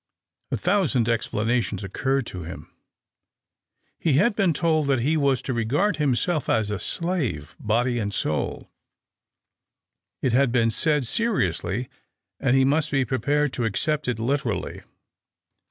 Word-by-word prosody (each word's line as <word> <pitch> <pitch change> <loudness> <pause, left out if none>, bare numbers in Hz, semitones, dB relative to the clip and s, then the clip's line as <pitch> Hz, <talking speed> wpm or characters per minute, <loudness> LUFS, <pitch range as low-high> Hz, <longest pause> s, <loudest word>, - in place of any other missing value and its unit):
A - - -1
thousand 175 - +1
explanations 115 -2 0
occurred 135 +7 -1
to 90 - -6
him. 85 +2 -9 1.3
He 160 - +1
had 200 - +3
been 195 -4 +3
told 155 -1 +1
that 135 -3 +2
he 150 +6 +1
was 140 -4 +1
to 130 - -2
regard 130 - +1
himself 150 +3 +1
as 110 -2 +1
a 105 - -2
slave, 125 - -2
body 120 +3 +1
and 100 -2 -2
soul; 75 -6 -2 1.5
it 130 - +1
had 135 0 +3
been 115 -2 +2
said 150 +2 +1
seriously, 115 - -1 0.5
and 135 -1 +2
he 135 - +4
must 150 +3 +2
be 135 -2 +1
prepared 145 +4 0
to 120 - -1
accept 150 +7 -1
it 125 -3 0
literally. 115 -3 -2
130 Hz, 140 wpm, -24 LUFS, 115-150 Hz, 1.5 s, he